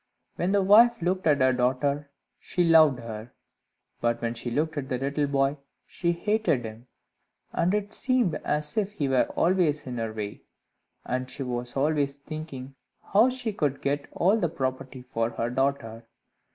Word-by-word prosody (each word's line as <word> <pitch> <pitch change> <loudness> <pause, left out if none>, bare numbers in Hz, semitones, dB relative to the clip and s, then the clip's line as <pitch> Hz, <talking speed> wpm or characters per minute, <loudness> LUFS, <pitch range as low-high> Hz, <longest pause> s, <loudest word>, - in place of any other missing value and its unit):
When 180 +2 -1
the 200 -1 +3
wife 230 +5 +6
looked 185 0 0
at 145 -3 +3
her 130 0 +4
daughter, 135 +3 0 0.3
she 175 - -1
loved 160 -5 +6
her; 115 +1 -8 0.7
but 120 0 0
when 115 0 -2
she 120 +1 -5
looked 155 +6 -1
at 135 -3 -4
the 125 - 0
little 140 +3 -1
boy, 140 +1 +1 0.3
she 170 -2 -1
hated 170 - 0
him, 110 +3 -9 0.7
and 170 +2 +1
it 205 0 -3
seemed 255 -9 +1
as 150 +6 -2
if 205 -1 0
he 150 -9 -1
were 130 -2 +2
always 170 -4 +2
in 125 -2 -5
her 115 -1 -2
way, 105 -2 -6 0.6
and 130 0 -2
she 135 - -4
was 120 0 -4
always 145 -1 +1
thinking 140 -3 -8 0.4
how 220 +6 +6
she 250 -4 -3
could 145 -8 -1
get 140 +1 -2
all 200 +6 +2
the 170 - +1
property 130 -3 -4
for 115 -2 -1
her 120 0 -3
daughter. 125 -4 -2
140 Hz, 170 wpm, -26 LUFS, 125-170 Hz, 0.7 s, wife